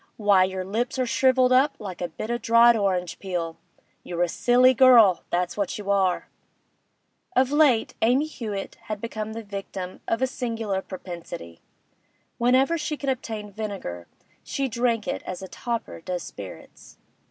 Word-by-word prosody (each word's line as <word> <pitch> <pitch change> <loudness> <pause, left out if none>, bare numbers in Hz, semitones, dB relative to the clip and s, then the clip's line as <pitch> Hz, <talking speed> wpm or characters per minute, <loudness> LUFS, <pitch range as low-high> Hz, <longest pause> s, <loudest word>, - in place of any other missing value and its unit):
Why, 200 -3 +4
your 185 0 -4
lips 235 +7 -2
are 255 - +1
shrivelled 255 +2 +3
up 275 +3 +4
like 185 -4 -7
a 175 - -1
bit 215 +7 -6
of - - +1
o' - - 0
dried 230 +1 +6
orange 185 -5 -1
peel! 175 -4 -3 0.5
You're 175 0 -1
a - - +2
silly 250 +6 +4
girl, 235 -8 +6
that's 175 0 -1
what 200 -2 -2
you 200 -1 -3
are!' 190 -2 +1 1.1
Of 260 +1 +3
late 290 -7 +3
Amy 250 +6 +3
Hewett 215 -10 -6
had 215 -1 -4
become 220 -1 -5
the 230 0 -6
victim 195 -2 -7
of 225 +3 0
a - - +6
singular 225 -6 -3
propensity; 170 - -8 0.8
whenever 260 +7 +3
she 300 0 -3
could 280 - -3
obtain 220 -5 -4
vinegar, 195 - -6 0.4
she 275 -1 -2
drank 235 -2 0
it - - -2
as 185 +1 -7
a - - -6
toper 235 -4 -5
does 180 0 -4
spirits. 100 -2 -11
215 Hz, 165 wpm, -25 LUFS, 185-250 Hz, 1.1 s, dried